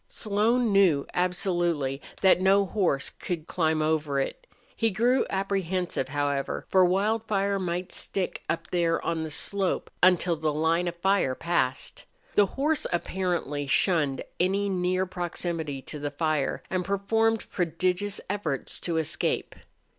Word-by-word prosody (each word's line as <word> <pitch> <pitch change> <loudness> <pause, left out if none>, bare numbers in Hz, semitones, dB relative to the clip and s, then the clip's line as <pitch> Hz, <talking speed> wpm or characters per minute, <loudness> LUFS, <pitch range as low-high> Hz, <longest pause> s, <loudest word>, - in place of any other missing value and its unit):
Slone 220 +3 +1
knew 185 -8 +4
absolutely 175 -6 0 0.2
that 190 -1 +5
no 195 +1 +4
horse 180 -9 0
could 170 -4 -5
climb 160 -3 +1
over 155 -3 0
it. - - -4 0.3
He 225 - +2
grew 240 +6 +2
apprehensive, 190 -6 -1
however, 145 0 -2
for 190 -1 +5
Wildfire 200 +1 +1
might 180 0 -3
stick 190 -2 -2
up 165 0 -3
there 170 -2 +2
on 165 -1 -1
the 160 - -4
slope 190 +5 0
until 180 -1 +4
the 155 -1 -1
line 160 +3 +1
of 175 - -3
fire 180 -7 +1
passed. 135 -7 -1 0.3
The 205 -1 +5
horse 295 +2 +1
apparently 175 -5 -2
shunned 145 -3 +2 0.2
any 195 +3 +1
near 185 0 0
proximity 170 -5 -4
to 150 - -7
the 145 0 -2
fire, 150 -1 -1
and 185 -1 0
performed 220 +4 +1
prodigious 180 +3 0
efforts 195 -9 -2
to 170 -2 -2
escape. 160 -2 0
180 Hz, 135 wpm, -27 LUFS, 160-195 Hz, 0.3 s, that